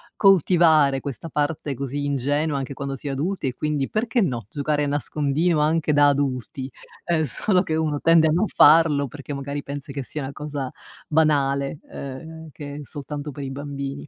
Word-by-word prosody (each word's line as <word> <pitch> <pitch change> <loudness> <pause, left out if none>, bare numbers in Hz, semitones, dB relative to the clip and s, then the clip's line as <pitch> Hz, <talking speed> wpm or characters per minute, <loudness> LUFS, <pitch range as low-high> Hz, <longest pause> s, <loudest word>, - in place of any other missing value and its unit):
coltivare 165 -7 +5
questa 140 +4 -6
parte 145 -1 -1
così 140 +2 -4
ingenua 145 +2 0
anche 135 +1 -5
quando 140 0 -4
si 145 - -8
è - - -1
adulti 155 +3 -2
e 125 - -2
quindi 150 -3 -1
perché, 225 +2 0
no, 120 - -1
giocare 145 0 0
nascondino 150 +3 0
anche 155 0 +2
da 145 0 +6
adulti. 135 -1 -2 0.3
Ehm, 165 -2 +1
solo 180 - +2
che 160 - -2
uno 155 -2 0
tende 165 -1 +5
a 155 - +2
non 180 +7 +2
farlo 150 -2 +5
perché, 145 +2 -8
magari, 140 +1 -4
pensa 140 0 -6
che 140 -1 -4
sia 150 +3 -6
una 135 - -5
cosa 145 -3 -5 0.4
banale, 140 -2 +1
ehm, 160 +4 -8
che 145 0 -8
è 150 - -6
soltanto 145 +3 -6
per 140 +1 -7
i 135 - -4
bambini. 140 0 -5
145 Hz, 180 wpm, -23 LUFS, 140-155 Hz, 0.4 s, da